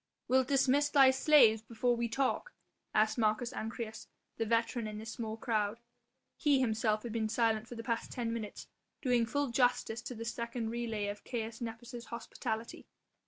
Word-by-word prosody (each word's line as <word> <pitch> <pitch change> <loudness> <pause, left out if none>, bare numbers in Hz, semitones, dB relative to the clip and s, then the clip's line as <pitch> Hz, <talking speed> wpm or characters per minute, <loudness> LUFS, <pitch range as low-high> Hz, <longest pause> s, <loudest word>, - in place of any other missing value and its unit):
"Wilt 260 0 +3
dismiss 280 +1 +3
thy 270 -2 +7
slaves 260 -5 +6
before 235 +2 0
we 235 0 -1
talk?" 275 - -1 0.4
asked 215 +2 +2
Marcus 220 +2 +1
Ancyrus, 225 0 -5 0.3
the 225 - -1
veteran 230 0 +1
in 210 0 -6
this 220 +1 -6
small 220 -1 -4
crowd. 220 -1 -1 0.6
He 290 -3 +3
himself 220 -3 +1
had 240 - -5
been 220 -1 -1
silent 225 -1 +1
for 240 - -8
the 230 - -6
past 230 -1 -2
ten 230 -2 -2
minutes, 220 -3 -5 0.4
doing 245 -3 +3
full 285 +2 0
justice 240 -2 +1
to 250 0 -6
this 230 +1 -4
second 235 -1 -3
relay 230 -3 -2
of 205 0 -5
Caius 225 -1 -4
Nepos' 235 +1 -6
hospitality. 230 -1 -5
230 Hz, 165 wpm, -33 LUFS, 220-245 Hz, 0.6 s, thy